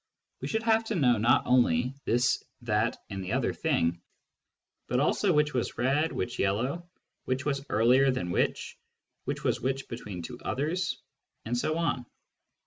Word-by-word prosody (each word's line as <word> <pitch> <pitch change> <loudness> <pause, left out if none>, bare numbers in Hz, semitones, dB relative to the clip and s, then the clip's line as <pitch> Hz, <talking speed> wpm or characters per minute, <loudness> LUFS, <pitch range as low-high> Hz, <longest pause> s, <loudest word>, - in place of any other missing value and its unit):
We - - -3
should 220 0 -1
have 225 0 +3
to 225 - -2
know 125 -8 +4
not 115 +3 +4
only 125 0 +3
this, 120 +2 +2 0.2
that, 110 0 +1
and 95 -1 -4
the 95 - -3
other - - +1
thing, 85 +1 0 0.9
but 125 - +1
also 185 +7 +2
which 150 -1 +2
was 125 -2 -2
red, 140 +6 +2
which 95 - -3
yellow, 125 - -1 0.4
which 130 +1 -1
was 140 -2 -1
earlier 125 +5 +4
than 90 -9 -1
which, - - -1 0.5
which - - -3
was - - +1
between 130 -7 -4
which - - -7
two 120 +5 -8
others, 160 +7 -1 0.5
and 115 +2 -1
so 155 +6 0
on. 135 -7 -1
125 Hz, 160 wpm, -29 LUFS, 115-150 Hz, 0.9 s, know